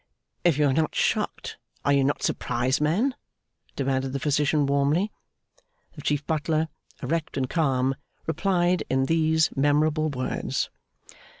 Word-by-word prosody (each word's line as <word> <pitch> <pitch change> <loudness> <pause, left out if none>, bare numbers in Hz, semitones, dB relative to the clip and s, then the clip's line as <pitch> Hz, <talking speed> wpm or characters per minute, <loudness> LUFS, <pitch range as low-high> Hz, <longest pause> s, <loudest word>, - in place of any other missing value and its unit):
'If 170 -5 +3
you 150 - +3
are 135 - +3
not 155 +3 0
shocked, - - -1 0.3
are 140 - +4
you 140 -1 +4
not 140 +2 0
surprised, 125 +3 0
man?' 195 - +2 0.6
demanded 135 -1 -1
the 140 - -1
Physician, 145 +1 +2
warmly. 140 +8 +1 0.8
The 150 - -10
Chief 145 0 -1
Butler, 160 0 0 0.3
erect 165 -2 -2
and 130 -1 0
calm, 135 -4 +1 0.3
replied 175 +1 +1
in 130 0 +2
these 160 +1 +2
memorable 150 +2 +2
words. 130 -3 -2
150 Hz, 130 wpm, -26 LUFS, 135-160 Hz, 0.8 s, are